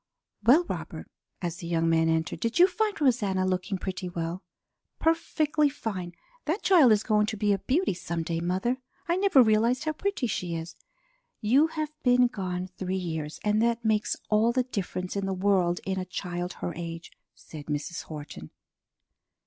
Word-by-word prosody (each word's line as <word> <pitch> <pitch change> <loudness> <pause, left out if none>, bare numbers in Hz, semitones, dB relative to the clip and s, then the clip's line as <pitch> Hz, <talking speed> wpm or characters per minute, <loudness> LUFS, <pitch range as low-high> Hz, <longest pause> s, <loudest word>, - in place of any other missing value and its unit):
Well, 265 +11 +6
Robert," - - -6 0.3
as 175 -1 -2
the 170 - -7
young 165 -1 +1
man 165 0 +3
entered, 160 0 0
"did 230 +6 -1
you 355 - +8
find 410 +2 -1
Rosanna 210 -9 +2
looking 185 +1 -1
pretty 185 -1 -4
well?" 170 +1 -4 0.6
"Perfectly 310 -2 +2
fine! 185 -10 -5 0.3
That 330 +8 -1
child 320 - +6
is 215 0 +3
going 210 -1 +2
to 215 -1 -3
be 205 0 +2
a 195 - -1
beauty 295 - +1
some 170 -1 -4
day, 165 0 -2
mother. 185 +9 0 0.3
I 340 - +2
never 375 -9 +6
realized 230 +4 +2
how 310 - 0
pretty 395 -4 -2
she 180 -6 -2
is." 165 +1 -6 0.6
"You 265 +9 +4
have 310 -2 -4
been 250 0 +5
gone 185 -6 -3
three 185 0 -1
years, 160 -4 -4
and 210 +1 +2
that 235 0 +1
makes 215 -1 +1 0.2
all 215 +2 +4
the 255 +1 +1
difference 190 -6 -4
in 200 -1 -1
the 190 - -1
world 185 -2 +2
in 190 -1 -1
a 185 - -3
child 180 -1 -4
her 175 - -5
age," 165 0 -7 0.2
said 150 -2 -11
Mrs. 150 +2 -3
Horton. 145 - -8
195 Hz, 175 wpm, -27 LUFS, 175-250 Hz, 0.6 s, you